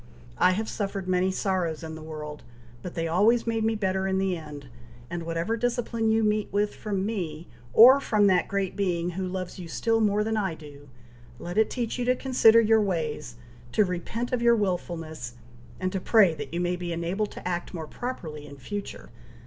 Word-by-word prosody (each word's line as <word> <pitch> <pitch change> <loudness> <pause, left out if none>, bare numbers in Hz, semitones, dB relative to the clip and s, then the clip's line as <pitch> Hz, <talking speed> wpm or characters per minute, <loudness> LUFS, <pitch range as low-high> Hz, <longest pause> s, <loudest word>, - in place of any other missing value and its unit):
I 180 0 +5
have 220 +3 -2
suffered 195 -3 -3
many 185 0 +2
sorrows 185 -4 -1
in 160 0 -6
the 160 - -8
world, 150 -1 -7 0.4
but 175 - -7
they 165 0 -1
always 210 +8 +3
made 225 -1 0
me 225 0 +1
better 190 -2 0
in 190 0 0
the 190 -1 +1
end, 150 -4 -9 0.4
and 175 0 -3
whatever 170 +7 -1
discipline 230 -1 -1
you 220 0 +3
meet 210 -1 0
with 205 +1 0
from 195 -3 -3
me, 175 -7 -4 0.2
or 255 - +9
from 215 -6 +2
that 185 -3 +3
Great 195 -2 -2
Being 175 -3 0
who 185 +1 -3
loves 185 0 -5
you 175 - -7
still 225 +6 0
more 210 0 +2
than 220 0 -1
I 190 -6 -1
do, 145 -2 -13 0.5
let 175 +1 -6
it 220 0 +3
teach 240 -1 -3
you 245 - 0
to 250 +1 +3
consider 245 -4 +5
your 225 -1 +4
ways, 155 - -2 0.4
to 215 - +4
repent 190 +7 -3
of 250 -2 0
your 235 0 +5
wilfulness, 165 - -3 0.4
and 185 0 -1
to 190 - -2
pray 200 -6 +5
that 155 - -7
you 170 - -2
may 175 0 0
be 175 -1 -5
enabled 175 +5 -2
to - - -7
act 175 -1 -3
more 165 -4 -5
properly 155 -8 -6
in 140 - -11
future." 205 +9 -7
190 Hz, 200 wpm, -27 LUFS, 170-220 Hz, 0.5 s, or